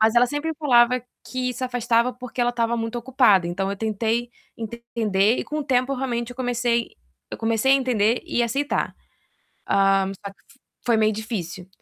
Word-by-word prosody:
Mas 220 +1 +4
ela 245 +1 +5
sempre 290 +4 -2
falava 250 -4 +4 0.2
que 255 -1 -2
se 255 - -3
afastava, 245 0 +1
porque 250 0 -7
ela 240 - +3
estava 235 -1 0
muito 230 +1 -3
ocupada, 235 -8 +3
então 195 +3 -2
eu 200 - -3
tentei 225 +3 -1 0.3
entender 225 -2 0
e - - -2
com 305 - -4
o - - -4
tempo 255 0 +1
realmente 245 -2 -2
eu 245 - -10
comecei 240 -2 0 0.4
eu - - -6
comecei 225 +3 +2
a - - +8
entender 240 -3 +1
e 240 - 0
aceitar. 275 +5 -1 0.7
Ah, 195 -1 +3 0.2
só 200 - -4
que 265 - -25 0.3
foi 235 -2 +3
meio 215 0 +3
difícil. 190 -5 -5
235 Hz, 180 wpm, -23 LUFS, 220-250 Hz, 0.7 s, a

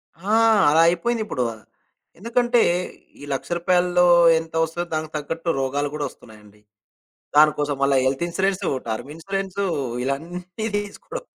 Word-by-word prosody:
ఆ! 190 +6 -5 0.4
అలా 160 +2 +5
అయిపోయిందిప్పుడు. 210 - -1 0.8
ఎందుకంటే 240 +2 +2 0.6
ఈ - - -10
100000 135 - -5
రూపాయల్లో. 180 0 +2 0.3
ఎంత 160 0 -10
వస్తుందో. 165 +2 -3
దానికి 155 0 -3
తగ్గట్టు 165 +3 -4
రోగాలు 140 +2 -1
గూడా 150 -1 -2
వస్తున్నాయండి. 105 -2 -18 0.7
దానికోసం 150 -1 +4
మళ్ళా 140 0 +3
హెల్త్ 135 +5 0
ఇన్స్యూరెన్స్, 190 +2 -1 0.3
టర్మ్ 110 +5 -4
ఇన్సూరెన్స్ 195 +3 -4 0.4
ఇలాన్నీ 175 - -4
తీసుకోడం. 205 - -7
165 Hz, 115 wpm, -22 LUFS, 145-190 Hz, 0.8 s, అలా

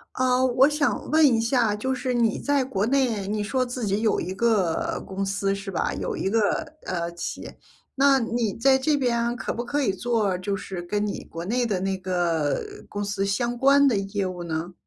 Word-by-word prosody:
啊， 255 0 +2
我 260 +2 +5
想 295 -1 -1
问 315 0 +5
一 235 -4 +3
下， 230 -3 +2
就 260 +5 -1
是 255 0 -2
你 230 -3 +1
在 285 -2 +1
国 205 -6 -1
内， 235 -6 +1
你 210 0 -1
说 255 +5 0
自 245 -2 -4
己 200 +1 0
有 220 - +2
一 185 +2 -4
个 205 -7 +1
公 195 +1 -3
司 195 0 0
是 200 0 -6
吧？ 180 - -1
有 - - -3
一 - - -1
个， 225 +2 +2 0.5
呃， 170 -2 -2
企 170 - -5
业， - - -10 0.4
那 275 0 +5
你 230 -3 -1
在 265 +3 +4
这 295 +3 +1
边 240 -3 0
可 - - -3
不 240 - -3
可 285 +4 -1
以 225 -9 +1
做 215 -2 0
就 195 +2 -2
是 190 -2 -6
跟 205 +4 -1
你 200 - -4
国 165 +1 -7
内 240 +6 0
的 210 -6 0
那 190 0 -1
个 175 -5 0 0.3
公 205 0 -4
司 200 -1 -2
相 235 +5 -1
关 280 +2 +5
的 250 -6 +3
业 195 0 -2
务 180 -1 -5
呢？ 165 +1 -4
220 Hz, 225 characters per minute, -25 LUFS, 195-255 Hz, 0.5 s, 我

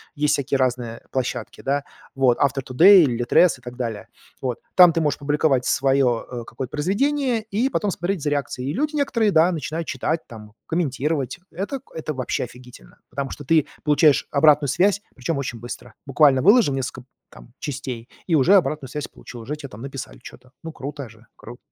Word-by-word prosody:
есть 150 0 +1
всякие 140 0 0
разные 120 -3 -1
площадки, 130 -2 -4
да, 140 +1 -1 0.3
вот 130 -3 +3
Author.Today, 140 +8 +5
"Литрес" 125 +5 +3
и - - -24
так 125 0 -9
далее. 115 -5 -4 0.3
Вот. 125 -2 -3 0.2
Там 180 -3 +8
ты 165 - 0
можешь 150 -2 0
публиковать 145 -2 +1
свое, 135 -3 +2
э, 120 -2 -5
какое-то 130 -2 -6
произведение 235 - 0
и 235 +7 +1
потом 205 -6 -1
смотреть 175 -2 -3
за 145 - 0
реакцией. 140 -1 -2
Люди 300 +3 -1
некоторые, 230 -7 +1
да, 165 +2 +4
начинают 160 0 -4
читать 160 0 -2
там, 105 -2 -12
комментировать. 150 -3 -1
Это 205 - -4
это 155 -2 -5
вообще 130 -1 -2
офигительно, 125 - -15
потому 135 +1 -3
что 145 - -9
ты 160 0 +3 0.2
получаешь 150 -1 +3
обратную 145 0 +4
связь, 195 +7 +2
причём 140 +4 -3
очень 120 -4 -4
быстро, 120 0 -9
буквально 135 -1 +4
выложил 205 - +5
несколько 130 -1 -4 0.2
там 120 - -16
частей- 130 -5 -6 0.2
и 170 - 0
уже 165 +8 +5
обратную 155 -7 +1
связь 150 +2 -5
получил, 120 - -12
уже 145 +7 -5
те 145 -3 -9
написали 125 - -8
чё-то, 125 - -14
ну 165 - -6
круто 140 -3 -7
же, 115 0 -19
кру 120 +2 -12
140 Hz, 175 wpm, -22 LUFS, 125-165 Hz, 0.3 s, Там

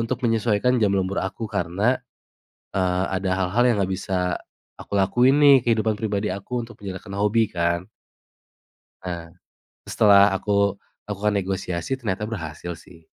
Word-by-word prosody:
untuk 125 +3 -3
menyesuaikan 115 +2 +2
jam 100 -2 +3
lembur 95 0 -1
aku 110 +4 -4
karena, 95 +9 0 0.8
eee, 95 0 +1
ada 95 0 -1
hal-hal 95 +6 +2
yang - - +1
nggak 95 0 0
bisa 90 -1 -1 0.4
aku - - -10
lakuin 125 +8 +4
nih 140 -1 +8
kehidupan 110 -2 +2
pribadi 105 -1 -1
aku 120 +5 -4
untuk 120 -2 -15
menyalurkan 95 +1 -7
hobi 105 +2 +2
kan. 85 +1 -1 1.2
Nah, 85 -2 -6 0.5
setelah 100 -1 +5
aku 100 0 +1 0.3
lakukan 105 +1 -1
negosiasi 95 +2 -3
ternyata 105 -6 -3
berhasil 90 -5 -6
sih. 85 -1 -16
100 Hz, 135 wpm, -23 LUFS, 95-110 Hz, 1.2 s, nih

